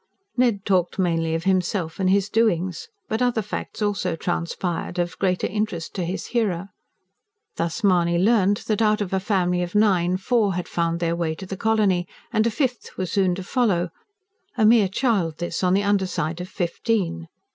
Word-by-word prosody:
Ned 235 Hz, -6 st, +1 dB
talked 180 Hz, -3 st, +1 dB
mainly 165 Hz, -3 st, +1 dB
of 165 Hz, -, -3 dB
himself 185 Hz, -2 st, 0 dB
and 190 Hz, -1 st, +2 dB
his 195 Hz, 0 st, +3 dB
doings. 190 Hz, -5 st, 0 dB, 0.2 s
But 220 Hz, -, -2 dB
other 245 Hz, -3 st, +1 dB
facts 210 Hz, +1 st, -5 dB
also 205 Hz, -5 st, 0 dB
transpired, 175 Hz, +1 st, -3 dB
of 175 Hz, -1 st, -1 dB
greater 185 Hz, -2 st, +1 dB
interest 205 Hz, -5 st, -3 dB
to 185 Hz, -, -2 dB
his 180 Hz, +3 st, -4 dB
hearer. 200 Hz, -6 st, 0 dB, 0.9 s
Thus 170 Hz, +6 st, -2 dB
Mahony 175 Hz, -3 st, +3 dB
learned 205 Hz, +1 st, +3 dB
that, 215 Hz, 0 st, 0 dB
out 215 Hz, -1 st, +3 dB
of 195 Hz, -2 st, -3 dB
a 190 Hz, -, +2 dB
family 185 Hz, -3 st, +1 dB
of 175 Hz, +2 st, -4 dB
nine, 185 Hz, -4 st, +3 dB
four 205 Hz, -2 st, +1 dB
had 180 Hz, -, -3 dB
found 170 Hz, 0 st, -1 dB
their 170 Hz, 0 st, +1 dB
way 165 Hz, -2 st, -1 dB
to 190 Hz, -, -8 dB
the 195 Hz, -, -5 dB
colony, 200 Hz, -4 st, +1 dB, 0.3 s
and 220 Hz, 0 st, +3 dB
a -, -, +3 dB
fifth 250 Hz, 0 st, -2 dB
was 185 Hz, -2 st, -3 dB
soon 190 Hz, -3 st, +2 dB
to 190 Hz, -, -6 dB
follow 180 Hz, -6 st, +1 dB, 0.7 s
a 220 Hz, -, +4 dB
mere 215 Hz, -3 st, +5 dB
child 190 Hz, -, 0 dB
this, 175 Hz, +1 st, -3 dB
on 180 Hz, 0 st, +3 dB
the 200 Hz, -, +2 dB
under 200 Hz, -2 st, +2 dB
side 170 Hz, -1 st, -3 dB
of 180 Hz, -, -7 dB
fifteen. 175 Hz, -, -1 dB
190 Hz, 185 wpm, -23 LUFS, 175-210 Hz, 0.9 s, mere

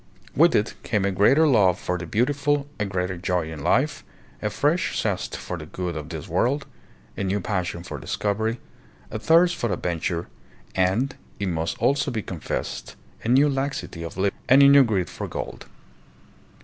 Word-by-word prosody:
With 165 Hz, +3 st, +5 dB
it 105 Hz, -, +1 dB
came 105 Hz, -4 st, 0 dB
a 100 Hz, -, +1 dB
greater 135 Hz, +12 st, +5 dB
love 100 Hz, -, +4 dB
for 90 Hz, -, -2 dB
the 85 Hz, -, -6 dB
beautiful, 140 Hz, -, +1 dB
a 105 Hz, -, +1 dB
greater 95 Hz, -1 st, -2 dB
joy 90 Hz, -2 st, -1 dB
hi -, -, -6 dB
life, 70 Hz, -, +1 dB, 0.4 s
a 105 Hz, -, 0 dB
fresh 150 Hz, -, 0 dB
zest -, -, -2 dB
for 90 Hz, -, -5 dB
the 75 Hz, -, -8 dB
good 90 Hz, +1 st, -4 dB
of 75 Hz, -1 st, -6 dB
this -, -, -6 dB
world, 140 Hz, +4 st, +1 dB, 0.5 s
a -, -, -3 dB
new 100 Hz, +1 st, 0 dB
passion 90 Hz, -4 st, -2 dB
for -, -, -6 dB
discovery, 110 Hz, +3 st, -1 dB, 0.5 s
a 110 Hz, -, -3 dB
thirst 170 Hz, +7 st, +4 dB
for 120 Hz, -, -2 dB
adventure, 85 Hz, -1 st, -2 dB, 0.5 s
and, 95 Hz, +9 st, +1 dB, 0.2 s
it 100 Hz, -2 st, -1 dB
must 80 Hz, -1 st, -2 dB
also 140 Hz, +1 st, +2 dB
be 110 Hz, -5 st, -3 dB
confessed 85 Hz, -4 st, -5 dB, 0.3 s
a -, -, -4 dB
new 135 Hz, +5 st, +5 dB
laxity 135 Hz, -, -3 dB
of 85 Hz, +1 st, -7 dB
living 100 Hz, +1 st, 0 dB
and 135 Hz, +3 st, +8 dB
a -, -, +9 dB
new 140 Hz, 0 st, +8 dB
greed 100 Hz, -7 st, 0 dB
for -, -, -6 dB
gold. -, -, -6 dB
105 Hz, 175 wpm, -24 LUFS, 90-135 Hz, 0.5 s, a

